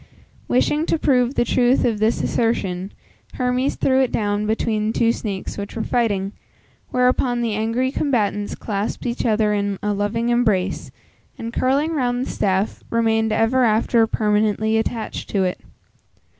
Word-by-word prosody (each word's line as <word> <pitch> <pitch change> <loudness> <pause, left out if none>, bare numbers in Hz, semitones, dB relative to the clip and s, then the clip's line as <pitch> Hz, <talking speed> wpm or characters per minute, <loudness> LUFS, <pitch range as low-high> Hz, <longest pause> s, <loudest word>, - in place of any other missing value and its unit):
Wishing 295 +5 +1
to - - +1
prove 255 -3 +2
the 240 - +2
truth 250 +1 +2
of 225 -4 0
this 220 +2 +1
assertion, 195 -5 -1 0.4
Hermes 250 +1 0
threw 265 0 +2
it 260 - +1
down 205 -1 -1
between 215 0 0
two 230 0 +2
snakes 205 -4 -5
which 200 - -6
were 225 - -2
fighting, 205 -5 0 0.6
whereupon 250 -1 +1
the 230 -2 -1
angry 230 +5 0
combatants 210 -8 -1
clasped 205 +2 -4
each 240 0 -1
other 215 -1 +2
in 200 -1 -1
a 210 0 0
loving 210 +4 -1
embrace, 215 -6 +1 0.5
and 230 0 -6
curling 275 +7 +1
round 245 -5 0
the - - -5
staff, 195 +1 -1
remained 225 -1 +1
ever 225 +4 +2
after 225 0 +3
permanently 215 0 +1
attached 225 0 -3
to 195 -2 +1
it. 180 -1 -2
225 Hz, 150 wpm, -21 LUFS, 210-245 Hz, 0.6 s, after